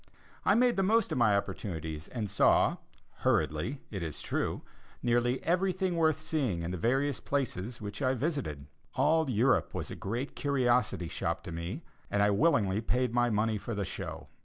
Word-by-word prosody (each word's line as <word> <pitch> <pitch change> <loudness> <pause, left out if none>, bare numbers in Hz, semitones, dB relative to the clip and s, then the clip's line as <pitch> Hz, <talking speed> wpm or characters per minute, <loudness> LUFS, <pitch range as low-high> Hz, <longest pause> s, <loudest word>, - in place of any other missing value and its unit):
I - - +4
made 245 -1 +3
the - - +3
most 220 +4 +3
of - - 0
my 105 -4 +5
opportunities 80 -6 -4
and 115 -4 -3
saw, - - +3 0.4
hurriedly, 100 - 0
it 100 -4 -4
is 80 -3 -4
true, - - -2 0.4
nearly 120 +1 +1
everything 185 +1 +1
worth 160 -2 +3
seeing 135 - -1
in 85 - -3
the 90 - -3
various 135 - +1
places 120 -5 -2
which 100 -1 -6
I 130 -1 +2
visited. 125 - -2 0.3
All 160 -1 +3
Europe 125 +3 +2
was - - -4
a - - -5
great 120 +8 -4
curiosity 125 - +1
shop - - -2
to - - -7
me 85 - -5 0.3
and 100 0 +2
I 105 - +4
willingly 105 - +2
paid 125 +1 0
my 120 0 +3
money 110 0 +1
for 115 +2 -5
the 100 -1 -1
show. - - -6
120 Hz, 175 wpm, -30 LUFS, 100-145 Hz, 0.4 s, my